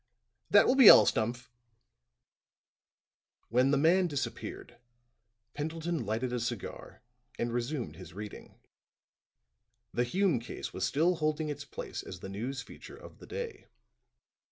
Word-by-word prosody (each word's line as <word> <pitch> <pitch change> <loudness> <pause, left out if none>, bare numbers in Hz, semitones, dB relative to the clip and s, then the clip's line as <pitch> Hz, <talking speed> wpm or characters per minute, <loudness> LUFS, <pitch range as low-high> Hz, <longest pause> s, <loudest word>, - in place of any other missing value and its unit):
That - - +7
will - - +4
be 265 -4 +9
all, - - +10
Stumph!" 120 +3 -1 2.0
When 125 +4 +3
the 140 - +3
man 175 +5 +4
disappeared, 145 -5 -5 0.7
Pendleton 160 -3 -3
lighted 120 +4 -2
a 125 - -1
cigar 120 -3 -6 0.3
and 120 0 -2
resumed 120 +2 -3
his 90 -3 -11
reading. 105 +1 -9 1.4
The 120 - +1
Hume 175 +2 +1
case 115 - -7
was 95 - -1
still 170 +4 +2
holding 155 -1 -1
its 145 -1 -5
place 140 - -6
as 90 - -9
the 95 - -7
news 125 +6 -4
feature 380 - -12
of 475 - -14
the - - -13
day. 460 -4 -6
135 Hz, 130 wpm, -31 LUFS, 120-165 Hz, 2.0 s, all